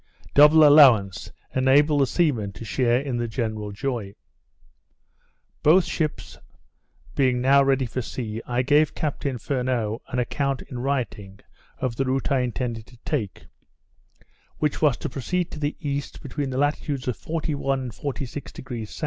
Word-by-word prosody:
Double 150 +1 +8
allowance 125 - +5 0.2
enabled 140 +3 +4
the 135 - +3
seamen 125 - 0
to 100 +5 -10
share 120 +2 +1
in 135 -3 -3
the 120 0 -1
general 110 -3 -3
joy. 105 -2 -4 1.5
Both 170 +4 +5
ships 155 -3 -3 0.7
being 130 -3 +2
now 135 +2 +5
ready 135 -1 +2
for 125 +2 -3
sea, 110 -1 -5
I 125 +1 0
gave 150 +3 +3
Captain 145 -3 -2
Furneaux 125 -4 -2
an 125 - -4
account 135 +2 -1
in 125 - -8
writing 115 -7 -3 0.4
of 120 -3 -3
the 135 - 0
route 130 +2 -1
I 135 - +3
intended 120 -2 -3
to 125 - -17
take; 110 - -3 1.1
which 150 -2 -1
was 145 -6 +3
to - - -4
proceed 170 +7 -2
to 155 - -7
the 145 0 -2
east, 145 -2 -4
between 140 0 -3
the 130 - -4
latitudes 145 -1 -1
of 125 - 0
41° 155 -2 -3
and 130 -2 -2
46° 130 -1 -6
S. 110 - -9
130 Hz, 150 wpm, -24 LUFS, 120-145 Hz, 1.5 s, Double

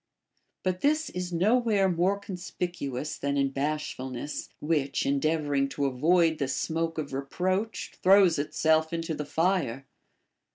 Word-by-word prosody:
But 185 -1 -1
this 305 +1 +1
is 180 0 -4
nowhere 210 +2 +3
more 185 +2 +1
conspicuous 175 -7 -5
than 140 0 -1
in 140 -1 +2
bashfulness, 140 -2 -3
which, 150 -3 0
endeavoring 140 0 +1
to 140 0 -2
avoid 160 +5 +3
the 140 - 0
smoke 165 +5 -2
of 145 -3 -4
re 135 - -1
proach, 185 +8 -2
throws 185 -4 +5
itself 160 +2 +1
into 165 -1 -2
the 150 -1 -4
fire. 160 -6 0
160 Hz, 130 wpm, -28 LUFS, 140-180 Hz, -, throws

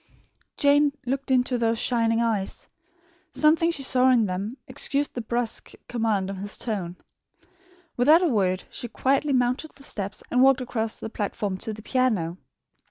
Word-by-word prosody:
Jane 285 0 +4
looked 270 +2 -2
into 250 -1 +2
those 230 0 +1
shining 230 -1 +1
eyes. 215 -4 -2 0.6
Something 320 +2 +3
she 290 -5 -3
saw 260 0 +3
in 240 -4 +4
them 200 +6 -4
excused 285 +1 -1
the 245 - -3
brusque 235 0 -2
command 220 -5 0
of 195 - -6
his 200 +2 -4
tone. 190 -6 -4 1.0
Without 305 +8 +6
a - - +4
word, 190 - +1
she 240 - -4
quietly 275 +5 +1
mounted 250 +4 +1
the 275 - -16
steps 200 -5 -5
and 250 - +3
walked 270 0 +6
across 225 -3 -2
the 220 - -6
platform 205 -2 -2
to 220 - -3
the 215 0 -9
piano. 215 -10 0
240 Hz, 160 wpm, -25 LUFS, 210-265 Hz, 1.0 s, Without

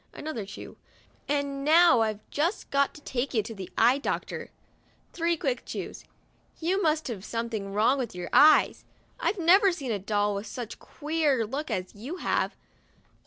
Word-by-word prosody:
(another 250 -10 -5
chew), 205 - -10 0.3
" - - -33
and 280 -1 -1
now 315 -3 +6
I've 215 -1 -2
just 335 +8 -1
got 280 0 +2
to 300 - -12
take 260 -1 -3
you 215 - +2
to 225 - -7
the 190 -3 -8
eye 245 +5 +5
doctor" - - -4 0.6
(three 335 0 0
quick - - -2
chews). - - -7 0.5
"You 365 +4 0
must 310 -3 +1
have 215 -7 -5
something 225 -3 -4
wrong 225 +7 +3
with 235 -7 -4
your 180 - -5
eyes; 305 +1 +6 0.4
I've 425 - 0
never 380 +3 +5
seen 280 -8 -4
a 205 - -1
doll 205 +1 0
with 200 +2 -5
such 235 +1 -6
a - - -16
queer 295 -6 0
look 280 +8 -4
as 185 0 -3
you 245 - -7
have." - - 0
265 Hz, 175 wpm, -27 LUFS, 215-315 Hz, 0.6 s, now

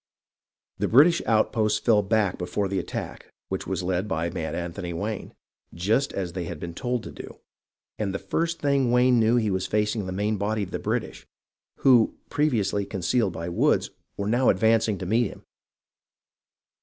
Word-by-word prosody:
The - - +1
British 155 +8 +5
outposts 110 -1 +2
fell 110 -3 +3
back 105 -2 0
before 90 +3 -1
the 95 0 -1
attack, - - -6 0.2
which 95 - -4
was 95 -2 -2
led 90 +2 -1
by 85 -2 -1
Mad 80 -3 -4
Anthony 85 0 -4
Wayne, 105 +5 -4 0.4
just 110 +11 +1
as 90 -3 -4
they 90 -1 -4
had 85 -2 -6
been 85 0 -6
told 125 +5 -2
to - - -8
do, - - -10 0.6
and 105 -3 -1
the 95 - -2
first 165 +13 -2
thing 140 -3 +2
Wayne 125 0 +4
knew 115 +1 +3
he 110 -4 +1
was 95 0 -1
facing 105 -1 0
the - - -4
main 105 +3 -1
body 105 +1 -1
of 95 - -7
the - - -3
British, - - -3 0.5
who, 125 -4 +5 0.2
previously 110 -9 +1
concealed 95 +2 0
by 85 - -5
the 85 - -4
woods, - - +2 0.3
were 100 - -2
now 120 +4 +3
advancing 110 +1 +3
to 95 - -6
meet 115 +5 +2
him. - - -12
105 Hz, 180 wpm, -25 LUFS, 95-115 Hz, 0.6 s, British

